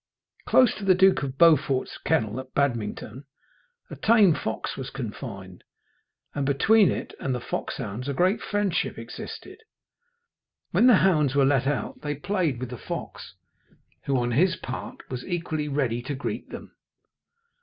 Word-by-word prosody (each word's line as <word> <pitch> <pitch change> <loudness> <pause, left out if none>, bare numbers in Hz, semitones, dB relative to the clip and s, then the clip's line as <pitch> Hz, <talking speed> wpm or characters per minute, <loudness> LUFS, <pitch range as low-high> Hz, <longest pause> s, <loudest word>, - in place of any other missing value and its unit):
Close 255 -3 +5
to 210 - -8
the 190 -1 +5
Duke 190 +1 +4
of 135 -1 -4
Beaufort's 150 -5 +3
kennel 110 +2 0
at 130 0 -10
Badmington 125 -1 -2 0.7
a - - -5
tame 215 -6 +5
fox 110 -6 -4
was 135 -1 -6
confined, 105 -7 -7 0.7
and 145 - -2
between 185 +9 +4
it - - -4
and 130 -2 -2
the - - -3
foxhounds 120 0 -5
a - - -1
great 185 +7 +2
friendship 205 -4 -1
existed. - - -9 1.1
When 250 - +4
the 245 - +8
hounds 150 -7 +2
were 140 -1 +4
let 135 -1 +2
out 145 -2 -2
they 150 0 -3
played 160 -4 -1
with 130 -1 -5
the 125 - -7
fox, 95 - -7 0.7
who, 135 -1 +1
on 120 -1 0
his 170 +8 +3
part, 130 - -7
was 125 -1 -4
equally 165 -4 -3
ready 130 -5 -1
to 140 +4 -4
greet 140 - -5
them. - - -9
140 Hz, 155 wpm, -25 LUFS, 125-175 Hz, 1.1 s, the